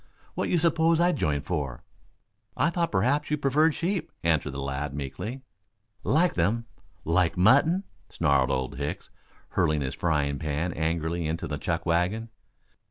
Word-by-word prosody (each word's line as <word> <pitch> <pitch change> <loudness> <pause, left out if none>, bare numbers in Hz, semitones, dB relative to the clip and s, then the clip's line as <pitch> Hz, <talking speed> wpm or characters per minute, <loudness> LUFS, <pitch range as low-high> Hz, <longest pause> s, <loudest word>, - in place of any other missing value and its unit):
What - - -2
you 175 - +3
suppose 165 0 +3
I 175 +1 +4
joined 75 - -1
for?" 70 -8 -3 0.7
"I 170 - +2
thought 170 -1 0
perhaps 130 +9 +1
you 150 - +1
preferred 150 +3 +3
sheep," 180 +1 -2
answered 80 -3 +2
the 70 - -5
lad 70 +1 -3
meekly. 105 - -5 0.6
"Like 170 +4 +3
them 105 +8 0 0.4
like 85 +1 +2
mutton?" 145 - +4 0.3
snarled 70 -5 +2
Old 65 0 -2
Hicks, 70 +1 -4 0.4
hurling 75 -1 +1
his 65 -1 -2
frying 75 -4 0
pan 80 +3 -2
angrily 80 +1 -1
into 80 +2 -2
the 75 -1 -4
chuck 85 -1 -2
wagon. 90 +7 0
85 Hz, 150 wpm, -27 LUFS, -, 0.7 s, I